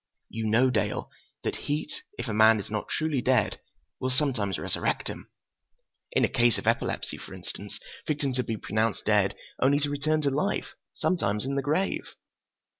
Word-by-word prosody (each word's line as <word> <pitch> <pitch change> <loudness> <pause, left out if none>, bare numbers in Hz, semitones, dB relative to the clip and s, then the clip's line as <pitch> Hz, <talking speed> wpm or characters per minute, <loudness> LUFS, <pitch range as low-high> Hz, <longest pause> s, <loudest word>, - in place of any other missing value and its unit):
You 110 -1 -2
know, 120 +4 +4
Dale, 105 -3 -1 0.3
that - - -1
heat, 150 +1 -1 0.2
if 120 - -4
a 110 - -2
man 110 +1 +6
is 100 - -7
not 105 -1 -2
truly 155 -4 0
dead, 130 +1 +2 0.4
will 130 - 0
sometimes 130 -8 +1
resurrect - - -1
him. - - -8 0.8
In - - +4
a - - +1
case 120 -1 +3
of - - -5
epilepsy, - - 0
for - - -9
instance, - - -7 0.3
victims 140 -4 0
have 125 - -1
been 110 -2 -2
pronounced 110 +1 0
dead 105 -2 +3 0.3
only 140 +2 +5
to 145 0 +1
return 155 +2 +1
to 140 - +2
life—sometimes 140 - -1
in 135 - -1
the 140 - +1
grave. 155 +8 -1
130 Hz, 170 wpm, -28 LUFS, 110-145 Hz, 0.8 s, man